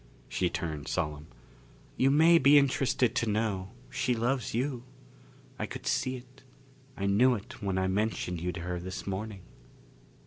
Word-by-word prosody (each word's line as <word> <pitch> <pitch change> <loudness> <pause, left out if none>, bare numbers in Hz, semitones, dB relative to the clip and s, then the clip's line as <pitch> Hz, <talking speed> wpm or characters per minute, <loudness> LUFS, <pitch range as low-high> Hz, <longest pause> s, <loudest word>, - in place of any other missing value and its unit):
She 90 - 0
turned 75 -4 -4
solemn. 75 -3 -2 0.7
"You 135 - +3
may 160 +4 +6
be 140 +1 +7
interested 130 -3 +2
to 115 - +1
know, 105 -3 -1 0.2
she 125 -2 0
loves 120 +2 0
you. 125 0 -1 0.8
I - - -2
could - - -8
see 130 0 0
it. 125 0 -13 0.6
I 100 - -2
knew 120 +6 +4
it 105 +1 -9
when 95 -2 -1
I 95 - +1
mentioned 95 -3 -1
you 90 +1 -1
to 85 - -6
her 90 0 -3
this 95 +2 -6
morning." 100 0 -4
105 Hz, 160 wpm, -30 LUFS, 95-130 Hz, 0.8 s, be